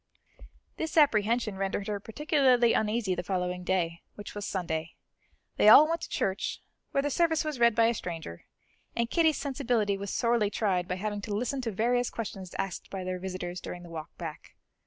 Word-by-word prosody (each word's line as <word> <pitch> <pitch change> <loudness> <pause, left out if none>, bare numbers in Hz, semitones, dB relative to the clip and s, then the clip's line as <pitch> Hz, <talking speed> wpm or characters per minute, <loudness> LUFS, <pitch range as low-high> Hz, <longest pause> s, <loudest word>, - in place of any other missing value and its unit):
This 320 0 -3
apprehension 230 -6 +3
rendered 195 +1 -2
her 205 -1 -2
particularly 255 0 +3
uneasy 215 -2 +1
the 175 - -2
following 180 0 -2
day, 175 -2 -1
which 205 - -8
was 205 -1 -5
Sunday. 165 -4 -3 0.6
They 210 - +6
all 295 +7 +10
went 330 0 -1
to - - -6
church, 190 0 -1 0.3
where 275 - 0
the 290 - -1
service 325 0 +2
was 305 -5 -3
read 235 -2 +5
by 230 0 +5
a 230 - +3
stranger, 165 - -6 0.5
and 235 0 -1
Kitty's 320 -3 +3
sensibility 245 -8 0
was 200 0 -5
sorely 235 -3 +2
tried 190 -5 0
by 185 - -2
having 205 +2 -3
to 205 0 -3
listen 250 +5 -1
to 235 -3 -2
various 245 +4 +1
questions 195 -5 -6
asked 195 -2 -4
by 190 -1 -5
their 185 0 -3
visitors 180 -1 -5
during 175 0 -7
the 170 - -11
walk 160 -2 -6
back. - - -8
210 Hz, 185 wpm, -29 LUFS, 185-245 Hz, 0.6 s, all